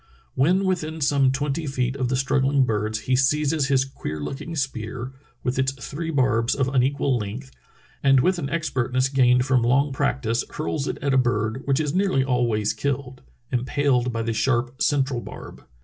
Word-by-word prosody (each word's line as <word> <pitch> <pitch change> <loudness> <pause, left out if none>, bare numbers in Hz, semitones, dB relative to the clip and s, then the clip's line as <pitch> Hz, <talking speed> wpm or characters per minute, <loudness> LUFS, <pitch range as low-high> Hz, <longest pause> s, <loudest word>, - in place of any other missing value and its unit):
When 180 +9 +2
within 160 -4 -2
some 140 -2 +3
twenty 145 +3 -2
feet 130 -1 -1
of 130 -3 -1
the 130 - +1
struggling 135 +1 +2
birds 110 -2 -1
he 130 +3 +1
seizes 145 +2 +2
his 135 -1 +2
queer 75 - -6
looking 140 - -5
spear, 125 -3 -3 0.3
with 125 +1 -1
its 130 0 +1
three 145 +5 -6
barbs 125 -6 +2
of 135 -2 0
unequal 135 0 +1
length, 115 +6 -6 0.5
and 135 -1 +5
with 180 +7 +2
an 140 -4 -3
expertness 130 -5 0
gained 125 -2 +3
from 130 -2 +3
long 135 +4 +2
prac 130 0 -1
tice 115 +1 0
hurls 150 -2 -2
it - - -3
at 140 -1 +1
a 130 - +5
bird, 115 0 0
which 135 +1 +2
is 150 -2 -1
nearly 185 -8 +2
always 120 -5 +1
killed, 130 +2 -3 0.3
impaled 125 0 +1
by 115 -1 -2
the 115 0 -1
sharp 125 +1 0
central 135 -4 +1
barb. - - -10
130 Hz, 180 wpm, -24 LUFS, 125-140 Hz, 0.5 s, and